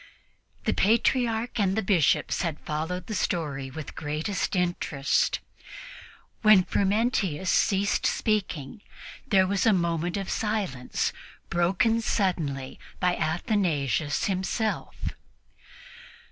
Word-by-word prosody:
The - - +1
Patriarch 230 +2 +1
and 195 -2 +2
the 220 - +1
Bishops 185 -7 +2
had 165 -4 -2
followed 165 +4 -3
the 215 - -5
story 150 -8 -2
with 150 +3 -7
the - - -9
greatest 155 +8 -2
interest. 175 -6 +1 1.0
When 215 -4 +7
Frumentius 200 -4 +1
ceased 200 0 +2
speaking, 195 -6 -1 0.5
there 190 -3 +4
was 195 +3 +1
a 220 - +6
moment 170 0 0
of 195 -1 -4
silence, 200 - -1 0.4
broken 190 +7 +2
suddenly 155 - -1 0.2
by 180 -1 +2
Athanasius 160 - 0
himself. 200 +3 -2
185 Hz, 105 wpm, -27 LUFS, 155-210 Hz, 1.0 s, When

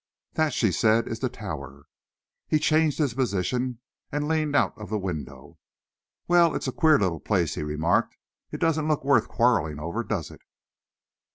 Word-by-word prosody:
"That," 155 -1 +1
she 110 -5 +1
said, 110 +5 +2
"is 115 - -4
the 130 - -1
Tower." 75 - -8 0.6
He 155 - +3
changed 155 -1 +2
his 145 -6 0
position 125 +1 -1 0.3
and 145 0 -2
leaned 155 -2 0
out - - +2
of 105 -2 -9
the 110 - -1
window. 80 -4 -6 0.7
"Well, 170 -2 +4
it's - - -3
a - - -1
queer 155 +1 +4
little 90 -6 0
place," 90 -5 0
he - - -4
remarked. 75 +3 0 0.3
"It - - -5
doesn't 155 -2 +1
look 150 -3 0
worth 140 0 +3
quarrelling 115 -12 +1
over, 85 +10 -3
does 100 -9 -3
it?" - - -14
115 Hz, 170 wpm, -26 LUFS, -, 0.7 s, Well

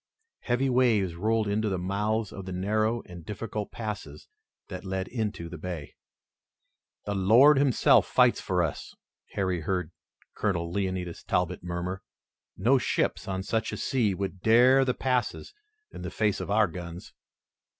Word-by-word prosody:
Heavy 125 +2 0
waves 120 -8 +2
rolled 110 +5 0
into 105 +1 0
the 95 - -1
mouths 105 +4 -1
of 95 - -7
the - - -4
narrow 110 +5 0
and 85 -2 -11
difficult 105 +2 -5
passes 105 -10 -6 0.4
that - - -7
led 95 -1 -3
into 105 -8 -3
the 85 -1 -9
bay. 85 -4 -6 1.1
"The 105 - -2
Lord 120 +10 +6
Himself 135 -3 +4
fights - - +3
for - - 0
us," - - -5 0.4
Harry 95 -3 -1
heard 90 -1 -2 0.4
Colonel 85 -5 -1
Leonidas 95 -2 -3
Talbot 90 -2 -1
murmur. 90 +2 -4 0.6
"No 130 +3 +3
ships - - -1
on 95 -1 -2
such 115 +3 -1
a - - -4
sea 110 -7 0
would 95 -1 -4
dare 125 +5 +6
the 125 -1 0
passes 125 -3 -1 0.4
in - - -9
the - - -4
face 105 -2 0
of - - -5
our 105 +1 +4
guns." 85 0 -8
100 Hz, 150 wpm, -27 LUFS, 90-115 Hz, 1.1 s, Lord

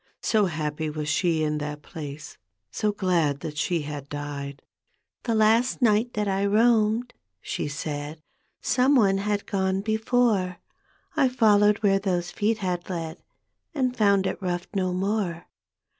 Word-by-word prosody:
So 215 -2 +3
happy 155 -1 -3
was 150 0 -4
she 160 +1 +1
in 150 0 0
that 150 0 -5
place, 150 -1 -8 0.3
So 210 - 0
^ad 170 -8 0
that 150 - -5
she 155 +2 0
had 145 -1 -7
died. 145 -1 -6 0.3
" - - -50
The 230 -2 +1
last 220 +3 +3
night 230 0 +2
that 210 -1 0
I 195 0 0
roamed," 225 +2 +3 0.3
she - - -3
said, 145 +1 -5 0.2
" - - -46
Some 255 +3 +3
one 195 -6 +4
had 205 0 -1
gone 190 -1 0
before. 220 -3 +1 0.6
I 265 - +4
followed 210 -3 +4
where 195 -1 +4
those 180 -3 -1
feet 215 +2 0
had 180 -4 -3
led, 165 -2 -5 0.5
And 255 -3 0
found 200 -4 +3
it - - -3
rough 175 -1 -2
no 185 -2 0
more. 185 -2 -1
190 Hz, 155 wpm, -25 LUFS, 155-215 Hz, 0.6 s, one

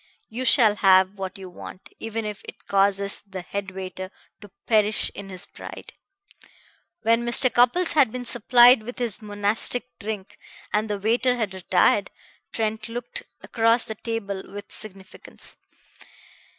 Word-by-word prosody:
You 245 +4 -5
shall 220 -6 +5
have 190 0 +4
what 190 0 -5
you 190 -1 -9
want, 185 +1 -11
even 225 0 -4
if 210 -1 -5
it - - -12
causes 200 0 +1
the 190 -2 -8
head 200 +1 -5
waiter 185 0 -7 0.3
to 205 - -12 0.2
perish 215 -1 +2
in 200 -1 -9
his 185 -2 -5
pride." - - -11 1.1
When 230 +1 +3
Mr. 240 +1 +4
Cupples 290 +10 +3
had 275 -8 +4
been 250 +1 -6
supplied 240 +1 +6
with 245 +3 -8
his 240 -2 -1
monastic 210 +4 +1
drink, 210 -2 -6 0.3
and 215 +1 0
the 205 - -1
waiter 240 +5 +1
had 220 -5 -2
retired, 190 -1 +2 0.4
Trent 220 0 -2
looked 240 +1 -6 0.2
across 230 +1 +2
the 220 - -5
table 215 -3 -4
with 205 +1 -9
significance. 195 -3 -11
215 Hz, 145 wpm, -24 LUFS, 195-235 Hz, 1.1 s, supplied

